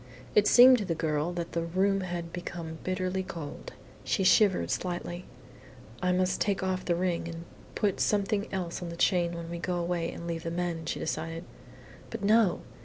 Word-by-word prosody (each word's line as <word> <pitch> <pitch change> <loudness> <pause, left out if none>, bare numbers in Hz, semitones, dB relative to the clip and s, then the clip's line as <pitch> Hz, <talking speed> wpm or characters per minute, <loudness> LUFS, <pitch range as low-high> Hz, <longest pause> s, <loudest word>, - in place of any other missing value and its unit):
It 210 0 +5
seemed 250 +1 +8
to 205 - -2
the 170 -3 -1
girl 155 +1 -1
that 170 -1 -4
the 170 - -1
room 190 +4 +1
had 175 -2 -5
become 170 -2 -6
bitterly 185 0 -1
cold. 165 -5 -7 0.3
She 195 - 0
shivered 195 0 +4
slightly. 175 0 -3 0.8
"I 180 0 +2
must 185 0 +1
take 200 -2 +1
off 185 -1 -1
the 175 - +1
ring 175 -1 -1
and 165 0 -6 0.3
put 205 -3 0
something 205 +1 +1
else 180 -2 -3
on 175 - -4
the 170 - -6
chain 175 -1 +2
when 170 -1 -6
we 170 - -4
go 180 +1 -2
away 170 -1 -1
and 170 - -8
leave 165 -1 -3
the 165 - -4
men," 170 -1 -3
she - - -2
decided. 165 +1 -3 0.7
But 230 -3 -6
no! 210 -2 +4
175 Hz, 185 wpm, -29 LUFS, 170-190 Hz, 0.8 s, seemed